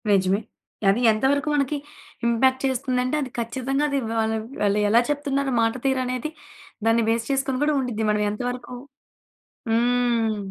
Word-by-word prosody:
నిజమే. 195 0 +3 0.5
అది 200 +4 +3
ఎంత 215 +2 -3
వరకు 285 +1 0
మనకి 290 +1 0 0.5
ఇంపాక్ట్ 260 +3 +2
చేస్తుందంటే 255 0 0
అది 265 - -3
ఖచ్చితంగా 260 +4 -1
అది 280 - 0 0.2
వాళ్ 220 -1 +1 0.3
వాళ్ళెలా 210 +2 +3
చెప్తున్నారు 280 -2 -1
మాట 225 0 +2
తీరనేది 255 +1 -1 0.6
దాన్ని 230 0 +4
బేస్ 230 +2 0
చేసుకొని 270 -1 0
గూడా 300 0 +2
ఉండిద్ది. 225 -4 -2
మనమెంత 210 +1 -1
వరుకు 245 0 -7 1.0
హ్మ్. 235 -1 +2
245 Hz, 130 wpm, -24 LUFS, 225-270 Hz, 1.0 s, దాన్ని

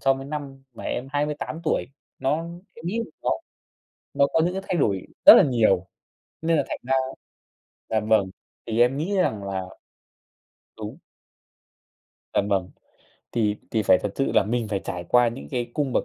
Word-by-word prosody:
so 135 0 +4
với 135 - -7
năm 140 -2 -6
mà - - -9
em 125 +2 -3
28 150 +2 -2
tuổi. - - +1 0.3
Nó 135 +3 +1 0.4
em 160 - -10
nghĩ 200 +6 -1
là - - +1 0.2
nó - - +1 0.8
nó 140 - +4
có - - +4
những 180 - 0
cái 190 - -3
thay - - 0
đổi 100 - 0 0.2
rất - - +13
là - - +8
nhiều 110 -8 +2 0.6
nên 165 0 +2
là 145 - +2
thành - - -3
ra 130 +2 +1 1.0
dạ 110 - +2
vâng, 105 -3 +2 0.4
thì 115 0 0
em 125 +3 +4
nghĩ 185 +7 -1
rằng 110 - +1
là 95 -1 -3 1.2
đúng. - - -7 1.4
Vâng, 100 - +2
vâng. 95 -3 0 0.6
Thì 105 -3 +1
thì 110 - +1
phải 95 - +5
thật 105 - -2
sự 135 - 0
là - - +4
mình 115 +1 -1
phải 100 -2 -1
trải 90 -2 -4
qua 120 -1 +5
những 70 -11 -8
cái 120 -1 -2
cung 140 -3 0
bậc - - +1
120 Hz, 185 wpm, -25 LUFS, 105-145 Hz, 1.4 s, rất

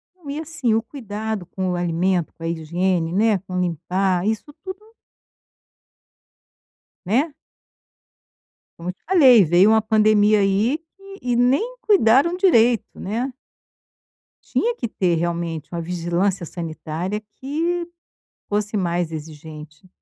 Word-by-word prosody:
Não 340 -6 -12
e 290 +2 -3
assim, 310 -7 -1
o 225 - +2
cuidado 220 -5 -5
com 185 +1 -3
o - - -1
alimento, 175 0 0
com 165 - -13
a - - -2
higiene, 170 +1 -1
né, 215 +2 +3
com 185 -1 -5
limpar, 180 +2 0
isso 220 +7 -3
tudo 375 0 -7 2.3
Né? 265 - +1 1.5
Como 170 +1 -5
eu - - -3
te - - -47
falei, 265 - +7
veio 175 +5 +5
uma 220 0 +4
pandemia 215 -1 +4
aí 200 +8 +2
que 390 +4 -15
e 245 -1 0
nem 275 - +2
cuidaram 340 - +4
direito, 240 - +3
né? 235 +7 -3 1.1
Tinha 475 0 0
que 235 - -3
ter 180 -5 0
realmente 170 -2 -3
uma 170 -1 -3
vigilância 175 +2 -1
sanitária 170 +4 -5
que 335 +6 -2 0.6
fosse 210 +1 -1
mais 175 -3 -1
exigente. 155 +1 -10
200 Hz, 125 wpm, -22 LUFS, 175-250 Hz, 2.3 s, falei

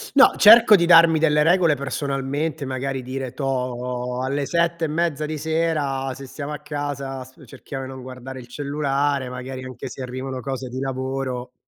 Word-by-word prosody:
no, 275 - +7
cerco 220 0 +9
di 170 -3 +3
darmi 165 -1 +7
delle 150 -1 +3
regole, 170 -1 +4
personalmente. 140 +2 -3
Magari, 130 0 -3
dire: 130 0 -5
“Toh, 125 -2 -3
alle 140 +1 -1
7 170 0 0
e - - -1
mezza 155 -1 -1
di 155 0 -4
sera, 150 -4 -1
se 135 +1 -10
stiamo 140 +3 -6
a 150 - -6
casa, 145 -3 -5
s 130 +1 -18
cerchiamo 135 0 -7
di - - -8
non 130 -1 -9
guardare 130 +1 -8
il 120 - -10
cellulare. 140 0 -1
Magari, 130 +1 -7
anche 130 -1 -7
se 130 - -7
arrivano 130 +1 -5
cose 130 -1 -5
di 130 - -5
lavoro, 130 -1 -3
135 Hz, 175 wpm, -22 LUFS, 130-150 Hz, -, cerco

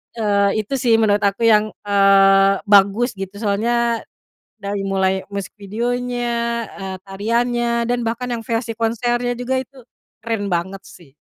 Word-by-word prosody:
Eee, 205 -1 +1
itu 215 - -7
sih 235 -2 +3
menurut 210 -2 +3
aku 200 +3 0
yang, 215 -2 +4
eee, 195 -1 +4
bagus 205 +4 +4
gitu 195 0 -7
soalnya 230 +3 0 0.6
dari 200 0 -3
mulai 190 0 0
musik 200 -1 -4
videonya, 245 +4 -2 0.5
eee, 190 -1 -5
tariannya 235 +4 -1
dan 245 -1 0
bahkan 235 +2 -3
yang 235 -1 -3
versi 230 0 -2
konsernya 240 +2 0
juga 250 +2 -2
itu 265 +1 -8 0.4
keren 225 -3 -2
banget 190 +3 -2
sih. 170 -6 -16
215 Hz, 140 wpm, -19 LUFS, 195-235 Hz, 0.6 s, yang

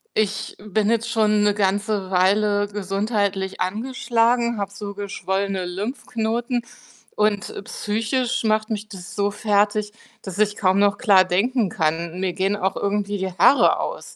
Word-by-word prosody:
Ich 210 -1 -1
bin 210 +1 0
jetzt 230 -1 0
schon 215 -2 +3
'ne 205 0 +3
ganze 200 0 0
Weile 205 +2 +2
gesundheitlich 200 -1 -2
angeschlagen, 235 +3 +1
habe 200 0 -3
so 200 0 -7
geschwollene 195 -1 -2
Lymphknoten. 230 +4 -2 0.5
Und 210 -1 0
psychisch 230 +4 -1
macht 215 0 +1
mich 215 0 -4
das 190 -3 -10
so 205 0 +1
fertig, 210 0 +1 0.3
dass 190 +1 -7
ich 210 -1 +2
kaum 190 -1 +2
noch 200 0 +3
klar 195 -3 +5
denken 210 +5 +1
kann. 165 +2 -1
Mir 185 -2 -1
gehen 195 +2 0
auch 190 -1 -1
irgendwie 205 0 -1
die 190 -1 -3
Haare 275 +10 +5
aus. - - -5
205 Hz, 145 wpm, -22 LUFS, 195-215 Hz, 0.5 s, klar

